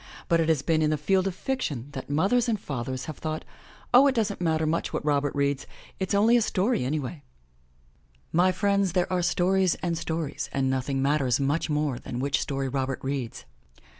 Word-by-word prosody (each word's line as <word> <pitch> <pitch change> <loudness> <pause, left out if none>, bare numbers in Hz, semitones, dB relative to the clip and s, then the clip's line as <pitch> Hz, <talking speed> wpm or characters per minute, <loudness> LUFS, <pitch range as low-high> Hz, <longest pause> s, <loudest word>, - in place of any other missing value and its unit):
But 170 - +3
it 165 0 +1
has 150 -4 +2
been 160 -2 +2
in 155 - +3
the 155 - +1
field 190 +5 +1
of 190 - -3
fiction 150 - -3
that 135 -2 -7
mothers 200 - +2
and 215 -3 0
fathers 130 -3 -4
have 155 - -7
thought, 155 0 -4 0.5
"Oh, 260 +3 +8
it 270 - +2
doesn't 210 -4 -1
matter 160 -2 +1
much 160 +2 -1
what - - -3
Robert 145 -1 +1
reads 140 -1 0 0.2
— - - -23
it's 190 +1 0
only 220 +4 +5
a 240 - +4
story 210 - +1
anyway!'' 140 +2 -3 1.1
My 180 +3 +4
friends, 200 -1 +1
there 180 0 +1
are 180 - +2
stories 180 +1 +2
and 170 -1 -2
stories 160 -2 -3
and 135 -1 0
nothing 135 +1 -1
matters 140 -3 +2
much 145 +4 0
more 150 -4 0
than 120 - -6
which 140 0 0
story 135 -1 -2
Robert 130 0 -2
reads. 135 - -4
155 Hz, 195 wpm, -26 LUFS, 140-185 Hz, 1.1 s, Oh